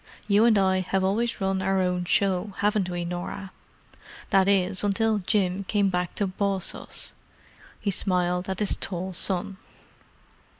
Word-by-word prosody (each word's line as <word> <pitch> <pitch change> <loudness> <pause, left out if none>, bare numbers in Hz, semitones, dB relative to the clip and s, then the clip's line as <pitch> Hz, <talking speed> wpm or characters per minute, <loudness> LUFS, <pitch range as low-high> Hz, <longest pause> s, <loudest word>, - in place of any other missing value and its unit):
You 210 +2 +5
and 225 -3 +5
I 190 -1 +3
have 190 +1 -1
always 220 +5 0
run 190 -1 0
our 190 0 +1
own 180 -1 0
show, 190 +2 +1
haven't 205 -2 +1
we, 175 -1 -3
Norah—that 185 +2 -4
is, 190 -1 +2
until 215 +1 +1
Jim 190 -1 0
came 200 0 +2
back 180 -1 -2
to 205 - 0
boss 195 0 -1
us!" - - -3 0.7
He 200 - -1
smiled 180 -1 0
at 190 - -2
his 210 - 0
tall 185 0 -4
son. 190 +2 0
190 Hz, 145 wpm, -26 LUFS, 180-200 Hz, 0.7 s, You